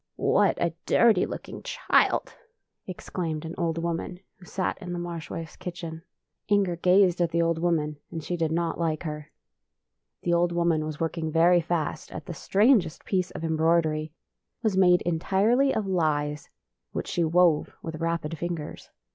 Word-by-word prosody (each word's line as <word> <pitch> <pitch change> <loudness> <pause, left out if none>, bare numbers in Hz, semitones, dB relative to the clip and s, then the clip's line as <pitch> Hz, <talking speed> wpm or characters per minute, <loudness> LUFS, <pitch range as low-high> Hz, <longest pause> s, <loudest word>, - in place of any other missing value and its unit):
" - - -60 0.2
What - - +3
a - - 0
dirty - - +4
looking - - -7
child! - - +1 0.3
" - - -53
exclaimed 170 -3 -4
INQER*S - - -5
LOAF - - -6
an 175 - -3
old 165 -1 -1
woman 170 +1 -3 0.2
who 180 - -14
sat 185 +2 -3
in 180 -2 -5
the - - -3
Marsh 170 -2 -5
wife's 165 -1 -6
kitchen. 170 -2 -7 0.5
Inger 200 -4 +2
gazed 180 0 +4
at 170 - +2
the 170 +1 +1
old 165 -1 0
woman, 155 -3 0
and 165 -2 -6
she 175 - -2
did 165 -2 -1
not 165 0 -1
like 160 -2 -1
her. 150 -2 -6 0.9
The 175 - +1
old 170 0 +2
woman 170 -2 +1
was 155 -1 -6
work 165 +1 -2
ing 160 -1 -2
very 170 +2 +5
fast 160 -2 -3
at - - -7
the 175 - -6
strangest 200 - +2
piece 185 -2 0
of - - -8
em 160 -1 0
broidery. 160 -1 +2
It 160 +8 -24
was 215 -4 +1
made 180 -2 +5
entirely 200 +10 +2
of 215 - -1
lies, 150 -5 -1 0.4
which - - -3
she 175 - -1
wove 165 -1 +3
with 160 -1 -5
rapid 165 -1 -1
fingers. 170 -3 -5
170 Hz, 185 wpm, -26 LUFS, 160-180 Hz, 0.9 s, very